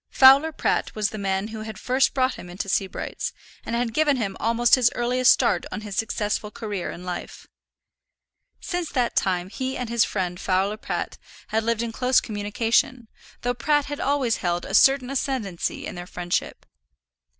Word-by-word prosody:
Fowler 275 +4 +7
Pratt - - -1
was 210 0 0
the 215 - -6
man 195 +1 -1
who 220 -1 -7
had 220 0 -7
first 260 +3 +1
brought 260 -1 +2
him 180 - -10
into 180 +3 -5
Sebright's, 190 0 -2 0.3
and 230 - -3
had 235 -1 -1
given 295 0 +3
him 200 -5 -2
almost 235 +1 +2
his 250 -2 +7
earliest 250 +1 +2
start 215 -8 +4
on - - -4
his 210 -2 -7
successful 210 -1 -1
career 210 -5 -4
in 175 - -8
life. 180 -1 -6 1.1
Since 355 -3 -3
that 245 -3 0
time 180 -1 0
he 260 +3 -3
and 250 -2 -4
his 235 -1 +3
friend 180 -3 -2
Fowler 195 +2 0
Pratt - - -4 0.3
had 220 0 0
lived 230 0 0
in 230 - -3
close 250 +2 +3
communion, 225 +3 0 0.3
though 245 0 0
Pratt 290 +4 +1
had 290 0 -5
always 270 -5 +1
held 175 -1 -1
a - - -7
certain 270 -1 +5
ascendancy 250 -10 -2
in - - -5
their 175 0 -7
friendship. 175 -1 -3
225 Hz, 175 wpm, -24 LUFS, 200-255 Hz, 1.1 s, Fowler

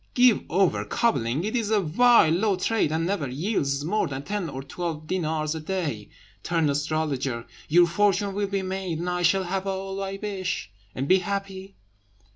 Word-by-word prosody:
"Give 245 -3 +5
over 190 +1 +2
cobbling; 150 - 0
it 215 +4 -2
is 225 -4 0
a 215 -1 +3
vile, 200 +1 +5
low 200 +3 +2
trade, 190 -3 0
and 160 +1 0
never 175 -7 -1
yields 145 - -1
more 210 +6 +1
than 135 0 -5
ten 200 -1 -3
or 135 -1 -6
twelve 160 +1 -5
dinars 155 -3 -1
a 160 - -4
day. 155 - -3 0.3
Turn 165 - +1
astrologer! 140 -5 -1 0.2
your 175 +3 +6
fortune 200 +2 +1
will 200 +1 -1
be 195 -1 -2
made, 185 -3 -3
and 175 +2 -4
I 180 0 -1
shall 190 +3 +3
have 190 +2 -3
all 195 0 -3
I 195 0 -4
wish, 190 - -3 0.2
and 135 +2 -2
be 190 +4 +5
happy." 195 0 -5
180 Hz, 180 wpm, -25 LUFS, 155-195 Hz, 0.3 s, your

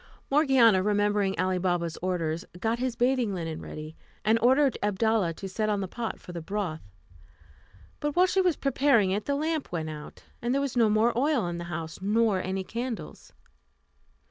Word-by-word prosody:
Morgiana, 265 -9 +5
remembering 205 -1 +1
Ali 185 0 +1
Baba's 175 -2 -1
orders, 170 -2 -1 0.2
got 225 +3 0
his 255 -1 -1
bathing 245 -4 +1
linen 165 -3 -4
ready, 155 +1 -8 0.3
and 220 +2 +4
ordered 265 +2 +4
Abdalla 210 -2 +1
to 195 - -6
set 215 +3 -1
on 205 -1 +1
the 190 - -3
pot 230 +4 -5
for - - -11
the 170 -1 -6
broth; 180 -3 -3 1.2
but 295 -1 -2
while 360 +1 +6
she 380 +1 +2
was 360 -4 +2
preparing 270 -8 +2
it 205 +2 -1
the 280 - 0
lamp 310 +1 -2
went 160 -2 -3
out, 150 -1 -10 0.2
and 240 +2 0
there - - +2
was 280 -3 -2
no 230 -3 +4
more 220 +3 +3
oil 270 - +2
in 175 0 -3
the 170 - -5
house, 165 0 -6
nor 210 -1 +2
any 190 +1 -3
candles. 235 +3 -6
210 Hz, 180 wpm, -27 LUFS, 180-250 Hz, 1.2 s, while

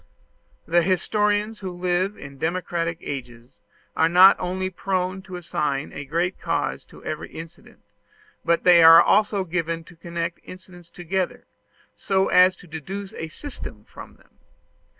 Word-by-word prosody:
The 175 +1 +3
historians 210 +4 0
who 190 -2 -5
live 180 +3 -1
in 140 -1 -11
democratic 165 0 -2
ages 120 -3 -8 0.4
are 160 - +3
not 185 +3 +8
only 185 +1 -3
prone 185 0 -2
to 190 -1 -10
assign 150 -5 -3
a 145 - -7
great 170 +5 -2
cause - - -2
to - - -17
every - - -5
incident, 165 +1 -12 0.6
but 170 0 +1
they 175 -2 +7
are 165 0 +10
also 205 +1 +3
given 165 -1 -3
to 170 - -17
connect 170 0 -5
incidents 180 -2 -13
together, 180 +2 -3 0.5
so 190 -1 0
as 185 +1 +5
to 180 - -17
deduce 190 +6 -7
a 160 - -6
system 285 - -9
from - - -13
them. - - -28
175 Hz, 145 wpm, -23 LUFS, 165-190 Hz, 0.6 s, are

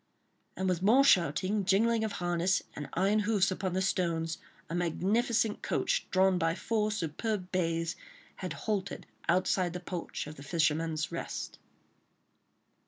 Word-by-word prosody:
And 190 - -1
with 180 -2 0
more 230 +8 +6
shouting, 190 - +3
jingling 220 +4 +3
of 215 -2 -2
harness, 175 +1 +1
and 150 - -6
iron 195 +4 +3
hoofs 205 -3 +2
upon 185 -1 -2
the 190 +1 +1
stones, 165 -3 0 0.3
a - - -6
magnificent 210 +6 +1
coach, - - 0
drawn 190 -1 +3
by 165 -1 +1
four 215 +1 0
superb 190 +1 -3
bays, 165 -2 0 0.4
had - - -4
halted 200 -3 -3 0.2
outside 180 0 +2
the 180 - -4
porch 180 -1 -5
of 150 +1 -9
"The 140 - -10
Fisherman's 160 0 0
Rest." - - -5
185 Hz, 140 wpm, -31 LUFS, 165-210 Hz, 0.4 s, more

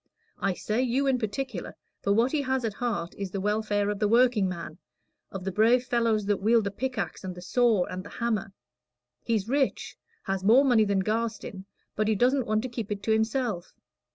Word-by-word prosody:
I 195 -2 0
say 215 +6 -1
you 260 +2 +1
in 265 -2 +2
particular, 220 -2 -4 0.3
for 200 - 0
what 230 +5 +3
he 305 - +1
has 260 -2 -1
at 220 - -2
heart 210 -8 -3
is 200 -1 -3
the 195 - -4
welfare 205 0 0
of 205 - -4
the 210 - +2
workingman 205 -8 +1 0.5
of 195 -2 -7
the 195 - -2
brave 230 +6 +4
fellows 230 -4 +1
that 205 -1 0
wield 225 +2 +4
the 200 - -2
pickaxe, 250 -2 -4
and 185 -1 -5
the 180 - -9
saw, 225 -2 +3
and 185 0 -6
the 205 - -10
hammer. 220 -4 -2 0.7
He's 220 -4 -1
rich 270 +1 0 0.3
has 195 -1 -2
more 240 +8 +6
money 235 -5 +4
than 200 -1 +1
Garstin 215 -3 -3 0.3
but 215 0 0
he 220 - +2
doesn't 250 +4 +2
want 215 +1 +1
to - - -2
keep 230 -4 -5
it 200 -1 -3
to 220 - 0
himself. 220 -4 -1
215 Hz, 200 wpm, -27 LUFS, 200-245 Hz, 0.7 s, more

